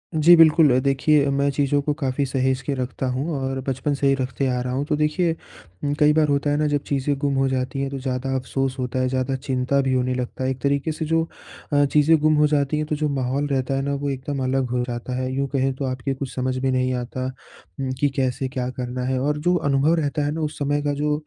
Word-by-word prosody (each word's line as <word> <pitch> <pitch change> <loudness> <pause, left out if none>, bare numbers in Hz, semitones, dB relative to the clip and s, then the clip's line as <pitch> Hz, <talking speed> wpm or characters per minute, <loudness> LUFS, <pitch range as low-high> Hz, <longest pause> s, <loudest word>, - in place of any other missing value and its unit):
जी, 160 +3 +7
बिल्कुल। 155 -5 +6
देखिए 140 +2 +2
मैं 140 +1 +2
चीज़ों 145 +1 +1
को 150 +1 -1
काफ़ी 135 -1 0
सहेज 130 0 0
के 140 +2 -2
रखता 130 0 -3
हूँ 135 +6 -2
और 135 0 -2
बचपन 135 +2 -1
से 140 0 0
ही 135 - +4
रखते 130 0 -2
आ 125 -1 0
रहा 125 0 -3
हूँ। 135 +2 0
तो 150 0 0
देखिए 155 +3 +1 0.6
कई 150 0 +5
बार 155 -1 +3
होता 140 0 +1
है 145 - +1
ना 150 0 +1
जब 145 -1 0
चीज़ें 140 0 0
गुम 140 -1 0
हो 135 0 +2
जाती 130 +1 -2
हैं 140 - -1
तो 140 - -4
ज़्यादा 130 0 -2
अफ़सोस 130 0 -2
होता 125 0 -2
है 130 - +1
ज़्यादा 130 +1 -1
चिंता 130 0 0
भी 135 -1 0
होने 130 0 +1
लगता 125 +1 -4
है। 130 - +1
एक 130 -1 -3
तरीके 140 +2 0
से 160 +1 -4
जो 165 +1 +2 0.5
अ, 145 0 +5
चीज़ें 150 +3 +4
गुम 155 +1 +3
हो 150 0 +4
जाती 145 0 +1
हैं 155 - -1
तो 150 - -1
जो 150 0 -1
माहौल 135 +1 -1
रहता 135 -1 -1
है 135 - 0
ना 140 - -1
वो 140 0 -2
एकदम 135 0 -3
अलग 130 0 0
हो 125 0 0
जाता 120 +1 -4
है, 130 0 -2
यूँ 140 +1 -1
कहें 135 0 +1
तो 135 - -3
आपके 130 +1 -2
कुछ 135 0 -6
समझ 130 0 -1
में 135 - +2
नहीं 130 0 +1
आता 125 +1 -3 0.7
कि 145 - +3
कैसे 130 0 0
क्या 125 -1 -3
करना 125 0 -3
है 130 0 0
और 150 +3 0
जो 175 +4 +1
अनुभव 140 -1 +2
रहता 150 -2 -1
है 145 - 0
ना 160 +2 -3
उस 150 -1 -3
समय 145 0 0
का 145 0 -1
जो 150 +1 0
135 Hz, 250 wpm, -23 LUFS, 130-145 Hz, 0.7 s, जी